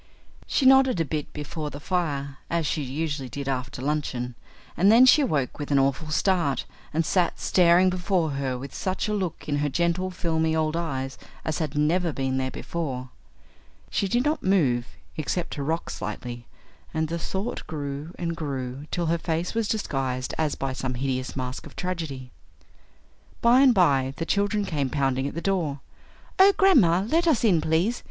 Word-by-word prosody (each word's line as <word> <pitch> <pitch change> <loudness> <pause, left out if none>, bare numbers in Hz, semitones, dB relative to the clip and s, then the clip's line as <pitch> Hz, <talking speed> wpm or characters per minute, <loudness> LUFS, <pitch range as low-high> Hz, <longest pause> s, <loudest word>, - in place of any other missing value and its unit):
She 275 - +1
nodded 265 -5 +6
a 165 - +2
bit 150 0 -4
before 150 +1 -5
the 145 - -8
fire, 140 -5 -2
as 170 -1 0
she 150 +2 -1
usually 145 0 -3
did 140 +1 -6
after 130 -1 -3
luncheon, 135 -4 -2 0.4
and 195 +4 +5
then 240 +3 +8
she 295 +4 +7
awoke 150 - -1
with 145 - -4
an 140 - +3
awful 140 +3 +1
start 170 -3 +1 0.3
and 160 +2 0
sat 180 0 +1
staring 180 +1 +4
before 180 -3 0
her 135 -2 -2
with 135 +1 -8
such 185 +2 -2
a 210 - -1
look 190 -6 -3
in 145 -1 0
her 145 0 0
gentle, 170 +5 0
filmy 160 -3 0
old 155 0 0
eyes 135 -6 -3 0.3
as 160 - -1
had 150 -2 -3
never 165 +3 +2
been 135 -2 -1
there 130 0 0
before. 130 -5 -4 0.8
She 200 - 0
did 240 +6 +1
not 300 +1 +1
move, 135 -11 +2 0.3
except 165 +3 -2
to 145 - -4
rock 160 +4 -2
slightly, 120 -1 -6 0.5
and 160 0 +1
the 170 +2 -3
Thought 195 +7 -4
grew 145 +2 -5
and 170 -1 -2
grew 140 -2 -4
till 175 - -1
her 165 +1 +1
face 165 +1 -2
was 225 -2 0
disguised 135 - -2
as 155 -2 0
by 135 -1 -3
some 130 -1 -3
hideous 130 0 -2
mask 130 0 -4
of - - -15
tragedy. 160 -8 -4 1.1
By 240 +2 +5
and 270 -1 +7
by 135 -7 +3
the 165 - -2
children 205 +2 +1
came 145 -7 -1
pounding 135 -1 0
at 145 - -6
the 170 - -3
door. 170 -8 -1 0.6
"Oh, 390 +1 +8
grandma, 215 - +5
let 335 +7 +2
us 300 -8 +3
in, 185 -8 +4
please. 165 +10 +1
160 Hz, 180 wpm, -25 LUFS, 135-185 Hz, 1.1 s, then